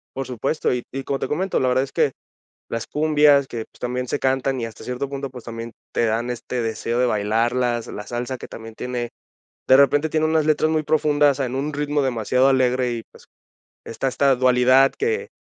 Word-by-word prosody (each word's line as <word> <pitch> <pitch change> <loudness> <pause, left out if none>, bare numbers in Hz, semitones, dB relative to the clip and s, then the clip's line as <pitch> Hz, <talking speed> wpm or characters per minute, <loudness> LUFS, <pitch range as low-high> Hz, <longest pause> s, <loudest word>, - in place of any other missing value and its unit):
Por 135 - -3
supuesto, 130 +4 -1
y 125 - -1
y 135 - -4
como 135 0 -2
te - - -2
comento, 185 +7 -1
la 130 - +1
verdad 125 +1 +2
es 135 - -7
que - - +1 0.5
las 115 - -4
cumbias 150 -2 +3
que, 115 - -6
pues, - - -24
también 125 0 -3
se - - -1
cantan 130 0 0
y 115 - -2
hasta 115 - -10
cierto 125 +2 -3
punto, 140 0 -5
pues, 125 -2 -11
también 115 0 -6 0.2
te - - +1
dan 115 +2 -1
este 125 0 -3
deseo 115 +1 -2
de 125 - +3
bailarlas, 120 +2 0
la 105 - -7
salsa 125 +2 -4
que - - -10
también 115 0 -10
tiene, 120 -1 -4 0.6
de 130 - +8
repente 145 +3 +4
tiene 155 0 +1
unas 155 -1 +2
letras 155 0 +2
muy 155 -1 +1
profundas 145 -2 +2
en 130 -2 -2
un 145 +3 -2
ritmo 145 0 -1
demasiado 130 +1 +2
alegre 125 -1 +2
y, 115 -1 -4
pues, - - -19 0.6
está 135 +3 -3
esta 135 +1 +3
dualidad 130 +1 +4
que 450 +1 -1
130 Hz, 205 wpm, -22 LUFS, 120-145 Hz, 0.6 s, de